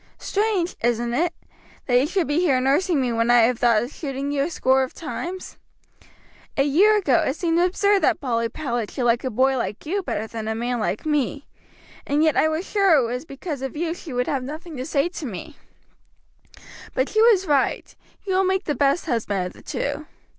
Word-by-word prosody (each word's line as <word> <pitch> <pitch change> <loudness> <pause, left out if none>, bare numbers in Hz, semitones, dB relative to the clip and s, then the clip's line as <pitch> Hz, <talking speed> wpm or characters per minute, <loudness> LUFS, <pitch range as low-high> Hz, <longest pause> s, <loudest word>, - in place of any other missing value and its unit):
Strange, 400 -4 -1
isn't 235 0 0
it, 340 +7 +1 0.5
that 245 -1 +4
you 270 - +1
should 370 +1 0
be 290 +3 0
here 295 -8 +3
nursing 295 +6 +2
me 250 -3 0
when 230 +1 +1
I 240 0 +6
have 235 +1 +2
thought 235 -3 +3
of 245 - -6
shooting 275 -1 -4
you 285 -1 0
a 285 - 0
score 265 -5 +2
of 260 - -3
times? 350 +3 -6 1.0
A 275 - +4
year 380 +10 +4
ago 295 - +3
it 270 - -1
seemed 335 0 0
absurd 395 +3 +3
that - - +2
Polly 230 -4 -1
Powlett 240 -5 -3
should 255 - -4
like 235 0 +2
a 260 - -1
boy 260 +3 +2
like 215 -3 -4
you 390 +6 -1
better 220 - -3
than 220 -1 -6
a 220 - -1
man 240 +1 -2
like 215 +2 -2
me, 290 -1 -1 0.6
and 290 +2 +2
yet 315 -2 +3
I - - +4
was 315 +4 -2
sure 395 -5 +4
it 260 - +2
was 250 +5 -4
because 280 -1 -6
of 270 +2 -5
you 330 +1 -1
she 340 -3 -10
would 250 0 0
have 275 -1 -1
nothing 310 +4 -7
to 255 - -4
say 295 0 +1
to 335 -5 -6
me; 235 - -8 1.4
but 260 +2 +1
she 435 - +2
was 440 -5 +5
right, 285 -5 0 0.3
you 385 - -1
will 380 +1 +3
make 380 0 +1
the 295 - -1
best 280 +3 +1
husband 215 - -1
of 180 - -6
the - - -16
two. - - -4
280 Hz, 215 wpm, -23 LUFS, 245-340 Hz, 1.4 s, I